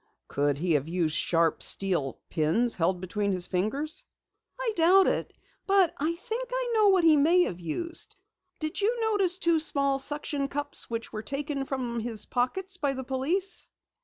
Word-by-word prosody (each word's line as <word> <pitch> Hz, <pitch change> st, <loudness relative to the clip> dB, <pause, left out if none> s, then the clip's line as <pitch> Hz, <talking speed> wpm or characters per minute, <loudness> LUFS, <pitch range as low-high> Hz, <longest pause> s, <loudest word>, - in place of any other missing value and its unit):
"Could 145 Hz, 0 st, 0 dB
he 170 Hz, +2 st, 0 dB
have 145 Hz, 0 st, 0 dB
used 165 Hz, -2 st, -1 dB
sharp, 165 Hz, -1 st, +1 dB
steel 175 Hz, -9 st, +2 dB
pins 170 Hz, +10 st, +2 dB
held 180 Hz, +1 st, 0 dB
between 200 Hz, +2 st, -2 dB
his 180 Hz, -1 st, +2 dB
fingers?" 275 Hz, -, -2 dB, 0.6 s
"I -, -, -1 dB
doubt 365 Hz, +3 st, +5 dB
it. -, -, -1 dB, 0.4 s
But 390 Hz, -4 st, +4 dB
I 320 Hz, +4 st, -2 dB
think 465 Hz, +6 st, -5 dB
I -, -, -2 dB
know 430 Hz, -2 st, +4 dB
what 380 Hz, -3 st, +4 dB
he 320 Hz, -2 st, +6 dB
may 335 Hz, +5 st, +4 dB
have 180 Hz, -, -4 dB
used! 330 Hz, -, -3 dB, 0.4 s
Did 310 Hz, +5 st, -3 dB
you 465 Hz, +4 st, 0 dB
notice 400 Hz, -5 st, +2 dB
two 335 Hz, -3 st, +2 dB
small 280 Hz, -3 st, +2 dB
suction 290 Hz, 0 st, -2 dB
cups 285 Hz, +1 st, -2 dB
which 230 Hz, -1 st, -5 dB
were 215 Hz, -, -4 dB
taken 275 Hz, +3 st, -3 dB
from 250 Hz, -4 st, -3 dB
his 225 Hz, -2 st, -3 dB
pockets 365 Hz, +10 st, -2 dB
by 285 Hz, -5 st, 0 dB
the 265 Hz, 0 st, -5 dB
police?" 300 Hz, +10 st, +1 dB
280 Hz, 170 wpm, -27 LUFS, -, 0.6 s, he